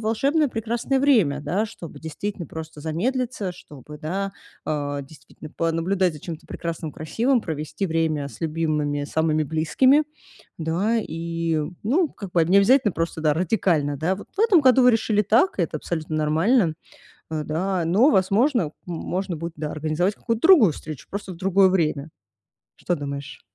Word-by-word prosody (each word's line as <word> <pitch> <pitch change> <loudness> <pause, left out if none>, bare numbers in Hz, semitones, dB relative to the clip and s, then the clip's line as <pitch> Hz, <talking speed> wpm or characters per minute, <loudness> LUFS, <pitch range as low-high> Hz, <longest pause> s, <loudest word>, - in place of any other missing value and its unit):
волшебное 275 +8 +1
прекрасное 235 +3 -1
время, 215 - +3
да, 195 +8 -1
чтобы 210 -7 -10
действительно 170 +3 -5
просто 160 0 -8
замедлиться, 210 - -2
чтобы, 150 -3 -12
да, 195 +6 -3 0.3
а, 145 -2 -2
действительно 145 +1 -13
понаблюдать 165 +3 0
за 150 - -10
чем-то 165 0 -8
прекрасным, 165 -2 -5
красивым, 235 - 0
провести 155 +4 -3
время 160 -4 0
с 115 - -14
любимыми, 150 -3 -1
самыми 155 +1 +1
близкими. 255 - +3 0.5
Да 175 +8 0
и 165 -4 -2 0.2
Ну, 300 - +2
как 200 -3 -8
бы 170 -2 +3
необязательно 200 +6 +4
просто, 165 -1 -3
да, 155 -2 +2
радикально, 160 -4 +1
да. 170 +6 0
Вот 205 - -11
в - - -1
этом 430 -7 +5
году 260 -1 +5
вы 250 - +7
решили 215 -2 +2
так 230 - +2
и 175 - +3
это 160 - -2
абсолютно 160 0 -4
нормально. 160 +5 +2 0.6
Э, 155 -1 -2
да. 180 +3 -1
Но, 205 - +4
возможно, 200 - +2
можно 175 +1 -3
будет, 170 +1 -5
да, 150 0 -4
организовать 155 +6 -1
какую-то 230 -1 -3
другую 290 - +7
встречу, 150 -1 -9
просто 200 -1 -5
в 170 - -13
другое 190 +1 +4
время. 155 -5 0 0.7
Что 175 - -1
думаешь? 140 -1 -6
170 Hz, 155 wpm, -23 LUFS, 155-215 Hz, 0.7 s, вы